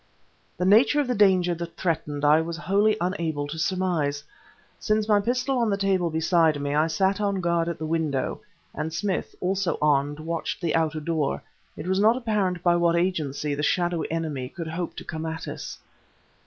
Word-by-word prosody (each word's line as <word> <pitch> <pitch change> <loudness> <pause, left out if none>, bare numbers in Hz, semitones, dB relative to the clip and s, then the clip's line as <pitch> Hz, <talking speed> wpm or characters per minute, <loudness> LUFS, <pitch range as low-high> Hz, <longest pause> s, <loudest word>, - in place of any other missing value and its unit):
The 180 - -1
nature 225 +9 +5
of 290 - +2
the 250 - +1
danger 190 -5 +4
that 170 0 -7
threatened 150 -4 -1
I 150 +2 +5
was 165 0 -4
wholly 200 +6 +2
unable 170 -6 -2
to 160 +2 -6
surmise. 165 -6 0 0.6
Since, 215 0 0
my 210 -2 +4
pistol 250 +4 0
on 230 -2 +2
the 200 - +1
table 190 -3 +1
beside 160 -1 +2
me, 140 0 -2
I 155 +2 +3
sat 190 +4 +1
on 200 -2 0
guard 170 -1 +1
at 170 - -4
the 155 - -5
window, 155 -2 -1 0.3
and 160 - -3
Smith, 195 +3 -2
also 185 -2 0
armed, 145 0 +1
watched 165 +1 -3
the 170 -3 -1
outer 160 -1 0
door, 155 -2 -1 0.3
it 150 - -6
was 190 +1 +1
not 220 +4 +4
apparent 205 -7 -1
by 175 -1 +4
what 170 -1 +2
agency 155 -5 -1
the 145 - -2
shadowy 175 +1 0
enemy 155 -6 -3
could 165 0 -6
hope 170 +1 -4
to - - -7
come 160 0 -5
at 160 0 -5
us. - - -6
170 Hz, 190 wpm, -25 LUFS, 155-190 Hz, 0.6 s, nature